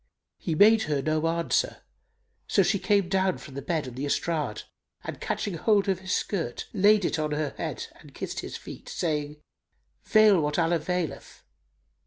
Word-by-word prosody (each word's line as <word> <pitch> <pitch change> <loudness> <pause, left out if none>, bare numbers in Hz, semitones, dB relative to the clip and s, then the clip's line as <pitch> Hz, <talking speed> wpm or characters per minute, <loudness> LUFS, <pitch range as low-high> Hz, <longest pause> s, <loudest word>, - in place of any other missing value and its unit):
He 160 - -2
made 220 +6 +6
her 145 -2 +1
no 155 +3 0
answer: 170 0 0 0.6
so 195 - +4
she 195 +2 +1
came 200 -2 +2
down 190 0 +1
from 140 - -12
the 140 - -5
bed 155 0 -2
on 125 - -7
the 135 +4 -3
estrade; 150 -6 -1 0.4
and - - -7
catching 205 - -2
hold 200 +4 +2
of 190 -2 +1
his 190 -1 -6
skirt 165 - -2
laid 205 -1 +4
it 165 - 0
on 150 -1 -1
her 150 -2 -2
head - - -4
and - - -15
kissed - - -4
his - - -6
feet, - - -10
saying, 150 -3 -2 0.7
"Veil 215 -5 +5
what 150 0 -1
Allah 170 0 +2
veileth!" 175 0 -4
170 Hz, 175 wpm, -27 LUFS, 150-195 Hz, 0.7 s, made